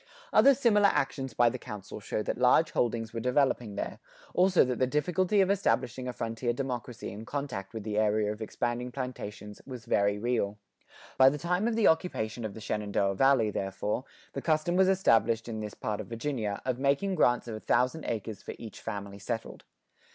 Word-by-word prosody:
Other 275 Hz, 0 st, +7 dB
similar 215 Hz, -6 st, +4 dB
actions 135 Hz, -, -1 dB
by 120 Hz, -1 st, +5 dB
the 130 Hz, -, -5 dB
Council 105 Hz, -3 st, -8 dB
show 105 Hz, +1 st, -3 dB
that -, -, -3 dB
large 130 Hz, +5 st, +4 dB
holdings 115 Hz, -1 st, -1 dB
were 115 Hz, -, -3 dB
developing 125 Hz, -3 st, +1 dB
there, -, -, -4 dB, 0.3 s
also 185 Hz, -2 st, +4 dB
that 125 Hz, -1 st, -2 dB
the 130 Hz, -, +3 dB
difficulty 180 Hz, +8 st, +2 dB
of 190 Hz, 0 st, +3 dB
establishing 130 Hz, -, 0 dB
a -, -, -1 dB
frontier 115 Hz, 0 st, -2 dB
democracy 125 Hz, -4 st, -4 dB
in 105 Hz, +3 st, -8 dB
contact 125 Hz, -7 st, -4 dB
with 110 Hz, -2 st, -6 dB
the 105 Hz, 0 st, -1 dB
area 105 Hz, -1 st, +2 dB
of 105 Hz, +1 st, -7 dB
expanding 120 Hz, +3 st, -2 dB
plantations, 105 Hz, -5 st, -6 dB
was 125 Hz, -4 st, -9 dB
very 100 Hz, 0 st, +2 dB
real.[91:2] 105 Hz, -3 st, -5 dB
By 130 Hz, 0 st, +9 dB
the 145 Hz, -, -3 dB
time 180 Hz, +7 st, 0 dB
of 235 Hz, -, 0 dB
the 225 Hz, -2 st, +2 dB
occupation 120 Hz, -9 st, 0 dB
of 110 Hz, -2 st, -5 dB
the 110 Hz, -, -9 dB
Shenandoah 100 Hz, -2 st, 0 dB
Valley, 120 Hz, 0 st, +3 dB
therefore, 105 Hz, +6 st, -2 dB, 0.3 s
the 135 Hz, -, -4 dB
custom 155 Hz, +3 st, +1 dB
was 190 Hz, 0 st, +5 dB
established 115 Hz, -, +3 dB
in 110 Hz, -2 st, -4 dB
this 105 Hz, -1 st, -6 dB
part 105 Hz, -1 st, -3 dB
of -, -, -9 dB
Virginia,[91:3] 115 Hz, -3 st, -3 dB
of 130 Hz, -1 st, -1 dB
making 140 Hz, +8 st, +1 dB
grants 125 Hz, -8 st, +2 dB
of 115 Hz, -, -5 dB
a 110 Hz, -, -5 dB
thousand 125 Hz, +8 st, +1 dB
acres 110 Hz, -2 st, -4 dB
for -, -, -7 dB
each 110 Hz, -3 st, -9 dB
family 100 Hz, -2 st, -6 dB
settled. 95 Hz, -, -5 dB
120 Hz, 190 wpm, -29 LUFS, 110-140 Hz, 0.3 s, By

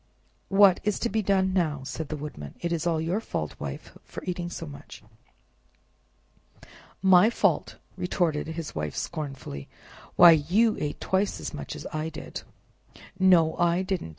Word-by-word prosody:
"What's 200 Hz, +1 st, +4 dB
to 235 Hz, -, -1 dB
be 220 Hz, +2 st, 0 dB
done 190 Hz, -1 st, +1 dB
now?" 155 Hz, -7 st, 0 dB
said 150 Hz, +2 st, -5 dB
the 155 Hz, -, -3 dB
Woodman; 140 Hz, -, -8 dB
"it 170 Hz, -, -3 dB
is 170 Hz, 0 st, -1 dB
all 165 Hz, -2 st, +1 dB
your 170 Hz, +6 st, -1 dB
fault, 75 Hz, -, -4 dB
Wife, 70 Hz, -1 st, -7 dB
for -, -, -9 dB
eating 175 Hz, -1 st, -3 dB
so 170 Hz, -, -6 dB
much." 145 Hz, -5 st, -11 dB, 2.0 s
"My 190 Hz, +2 st, +7 dB
fault!" -, -, +1 dB, 0.2 s
retorted 175 Hz, -5 st, -1 dB
his 160 Hz, -1 st, -5 dB
Wife 75 Hz, -1 st, -4 dB
scornfully, 135 Hz, -, -5 dB, 0.5 s
"why, 175 Hz, -1 st, +9 dB
you 180 Hz, +9 st, +3 dB
ate 145 Hz, -1 st, -3 dB
twice 190 Hz, +2 st, 0 dB
as -, -, -6 dB
much -, -, -6 dB
as -, -, -8 dB
I 155 Hz, +1 st, -2 dB
did!" 155 Hz, -, -7 dB, 0.8 s
"No, 175 Hz, -4 st, +5 dB
I 175 Hz, +1 st, +2 dB
didn't!" 185 Hz, -, -3 dB
170 Hz, 150 wpm, -27 LUFS, 150-190 Hz, 2.0 s, why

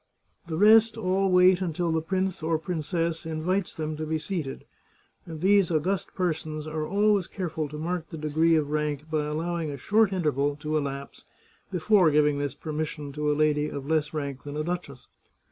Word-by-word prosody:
The 160 Hz, -2 st, -3 dB
rest 220 Hz, +3 st, +6 dB
all 195 Hz, -2 st, +1 dB
wait 180 Hz, 0 st, +5 dB
until 170 Hz, -1 st, -1 dB
the 160 Hz, 0 st, +1 dB
prince 190 Hz, +2 st, -2 dB
or 160 Hz, +1 st, +1 dB
princess 165 Hz, 0 st, -2 dB
in 160 Hz, -1 st, -4 dB
vites 185 Hz, +2 st, -1 dB
them 155 Hz, -1 st, -3 dB
to 155 Hz, -, -3 dB
be 160 Hz, 0 st, 0 dB
seated, 155 Hz, -3 st, -4 dB, 0.6 s
and 160 Hz, -2 st, -7 dB
these 195 Hz, -1 st, +4 dB
august 175 Hz, +4 st, -1 dB
persons 155 Hz, -4 st, -2 dB
are 155 Hz, 0 st, -3 dB
always 205 Hz, -1 st, +2 dB
careful 160 Hz, -5 st, -4 dB
to 150 Hz, -, -7 dB
mark 165 Hz, +1 st, -3 dB
the 165 Hz, -, -7 dB
degree 160 Hz, +2 st, +2 dB
of 150 Hz, -2 st, 0 dB
rank 150 Hz, 0 st, -2 dB
by 155 Hz, -1 st, 0 dB
allowing 165 Hz, +1 st, -2 dB
a 140 Hz, -, -5 dB
short 210 Hz, -, +3 dB
interval 145 Hz, -6 st, 0 dB
to 150 Hz, +1 st, -3 dB
elapse 140 Hz, -2 st, -4 dB, 0.5 s
before 185 Hz, 0 st, +4 dB
giving 150 Hz, -1 st, +3 dB
this 145 Hz, -2 st, -3 dB
permission 150 Hz, -2 st, -4 dB
to 150 Hz, +1 st, -1 dB
a 145 Hz, -, 0 dB
lady 150 Hz, -1 st, +2 dB
of 140 Hz, -1 st, -6 dB
less 155 Hz, -1 st, +1 dB
rank 140 Hz, -4 st, -4 dB
than 145 Hz, +2 st, -7 dB
a 150 Hz, -, -1 dB
duchess. 165 Hz, -6 st, -5 dB
160 Hz, 185 wpm, -27 LUFS, 150-180 Hz, 0.6 s, rest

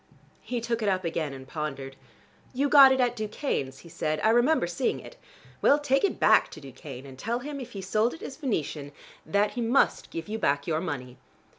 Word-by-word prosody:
He 245 Hz, -2 st, -3 dB
took 235 Hz, 0 st, -2 dB
it 210 Hz, -, +1 dB
up 185 Hz, -1 st, 0 dB
again 160 Hz, -3 st, -2 dB
and 130 Hz, -1 st, -10 dB
pondered. 135 Hz, -3 st, -5 dB, 0.6 s
"You 280 Hz, +2 st, +1 dB
got 275 Hz, -2 st, +9 dB
it 265 Hz, -, +2 dB
at 245 Hz, -1 st, +2 dB
Ducane's," 215 Hz, -, -3 dB
he 170 Hz, -, -14 dB
said. 155 Hz, -1 st, -2 dB
"I 220 Hz, -, +4 dB
remember 240 Hz, -, +3 dB
seeing 235 Hz, +9 st, -1 dB
it. -, -, -12 dB, 0.5 s
Well, 285 Hz, -, +5 dB
take 280 Hz, -2 st, +1 dB
it 400 Hz, -, 0 dB
back -, -, +5 dB
to -, -, -9 dB
Ducane, 135 Hz, -1 st, -10 dB
and 135 Hz, -1 st, -12 dB
tell 230 Hz, -, -1 dB
him 280 Hz, +3 st, -6 dB
if 250 Hz, -2 st, -8 dB
he 195 Hz, -2 st, -6 dB
sold 215 Hz, -, +1 dB
it -, -, -13 dB
as 270 Hz, -, -6 dB
Venetian, 155 Hz, -, -3 dB, 0.3 s
that 205 Hz, +1 st, +2 dB
he 245 Hz, -, -4 dB
must 235 Hz, +4 st, +2 dB
give 165 Hz, -1 st, -6 dB
you 220 Hz, +1 st, -4 dB
back 140 Hz, -6 st, +1 dB
your 160 Hz, -1 st, -1 dB
money. 130 Hz, -8 st, -5 dB
205 Hz, 210 wpm, -27 LUFS, 150-250 Hz, 0.6 s, got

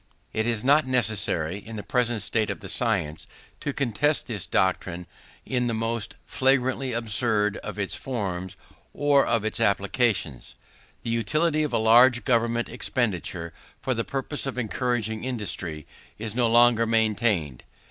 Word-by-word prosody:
It 110 Hz, +1 st, -1 dB
is 115 Hz, -3 st, -1 dB
not 145 Hz, +1 st, +4 dB
necessary, 100 Hz, -8 st, 0 dB
in 110 Hz, +2 st, -10 dB
the 105 Hz, -, -6 dB
present 120 Hz, -4 st, 0 dB
state 110 Hz, -2 st, 0 dB
of 100 Hz, -4 st, -5 dB
the -, -, -8 dB
science, 95 Hz, -10 st, +3 dB, 0.3 s
to 145 Hz, -, -3 dB
contest 140 Hz, +3 st, +1 dB
this 105 Hz, -7 st, -5 dB
doctrine 90 Hz, -1 st, 0 dB, 0.4 s
in 125 Hz, -1 st, -1 dB
the 115 Hz, -, -1 dB
most 115 Hz, 0 st, -3 dB
flagrantly 130 Hz, 0 st, +1 dB
absurd 110 Hz, -2 st, +1 dB
of 105 Hz, -1 st, -7 dB
its 100 Hz, -2 st, -1 dB
forms 95 Hz, -8 st, -4 dB, 0.4 s
or 145 Hz, -1 st, +3 dB
of 115 Hz, -2 st, 0 dB
its 110 Hz, -, -1 dB
applications. 100 Hz, -, 0 dB, 0.5 s
The 115 Hz, -, -3 dB
utility 155 Hz, +8 st, +1 dB
of 150 Hz, -, -1 dB
a -, -, +1 dB
large 120 Hz, +1 st, +5 dB
government 120 Hz, -1 st, +1 dB
expenditure, 95 Hz, -, -3 dB, 0.3 s
for 130 Hz, -, -1 dB
the 115 Hz, -1 st, -2 dB
purpose 135 Hz, +2 st, -4 dB
of 135 Hz, -, -4 dB
encouraging 115 Hz, -2 st, -2 dB
industry, 95 Hz, -, -4 dB, 0.3 s
is 110 Hz, -1 st, -5 dB
no 120 Hz, 0 st, +2 dB
longer 120 Hz, 0 st, +5 dB
maintained. 110 Hz, -, +1 dB
115 Hz, 145 wpm, -25 LUFS, 105-125 Hz, 0.5 s, large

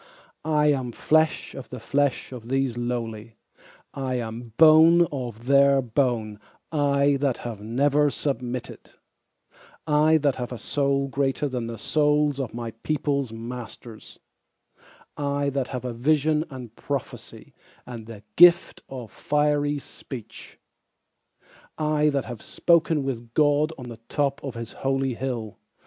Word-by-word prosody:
I 150 Hz, -1 st, +3 dB
am 130 Hz, -4 st, -2 dB
flesh 155 Hz, +6 st, +1 dB
of 135 Hz, -, -9 dB
the 125 Hz, -, -7 dB
flesh 140 Hz, +3 st, 0 dB
of 120 Hz, -3 st, -9 dB
these 135 Hz, -1 st, 0 dB
lowly, 115 Hz, -2 st, -4 dB, 0.6 s
I 130 Hz, -2 st, -3 dB
am 115 Hz, 0 st, -5 dB
bone 160 Hz, +2 st, +7 dB
of 120 Hz, -5 st, -6 dB
their 140 Hz, +1 st, +5 dB
bone 120 Hz, -4 st, -1 dB, 0.3 s
I 140 Hz, -2 st, +2 dB
that 135 Hz, -3 st, 0 dB
have 115 Hz, -4 st, -5 dB
never 140 Hz, +6 st, +2 dB
submitted; 125 Hz, -4 st, -4 dB, 0.9 s
I 155 Hz, +1 st, +4 dB
that 145 Hz, -3 st, +1 dB
have 125 Hz, -1 st, -4 dB
a 125 Hz, -, -5 dB
soul 140 Hz, +4 st, 0 dB
greater 135 Hz, +1 st, -1 dB
than 125 Hz, -4 st, -3 dB
the 115 Hz, 0 st, -6 dB
souls 150 Hz, 0 st, +1 dB
of 130 Hz, -4 st, -3 dB
my 115 Hz, -1 st, -5 dB
peopleŌĆÖs 140 Hz, -4 st, -1 dB
masters, 115 Hz, -1 st, -9 dB, 1.0 s
I 140 Hz, -1 st, -1 dB
that 135 Hz, -2 st, -1 dB
have 125 Hz, -2 st, -5 dB
vision 150 Hz, +5 st, +1 dB
and 125 Hz, -5 st, -9 dB
prophecy, 140 Hz, -3 st, -6 dB, 0.3 s
and 115 Hz, -3 st, -9 dB
the 110 Hz, -3 st, -10 dB
gift 175 Hz, 0 st, +6 dB
of 125 Hz, -4 st, -8 dB
fiery 145 Hz, 0 st, 0 dB
speech, 120 Hz, -5 st, -10 dB, 1.2 s
I 150 Hz, -1 st, +2 dB
that 140 Hz, -2 st, -1 dB
have 120 Hz, -3 st, -8 dB
spoken 165 Hz, -3 st, +2 dB
with 120 Hz, -3 st, -5 dB
God 150 Hz, +1 st, +3 dB
on 125 Hz, -2 st, -8 dB
the 115 Hz, -2 st, -10 dB
top 140 Hz, -1 st, -1 dB
of 135 Hz, -3 st, -5 dB
his 115 Hz, -1 st, -6 dB
holy 135 Hz, -1 st, -1 dB
hill. 120 Hz, -4 st, -5 dB
135 Hz, 135 wpm, -25 LUFS, 120-145 Hz, 1.2 s, bone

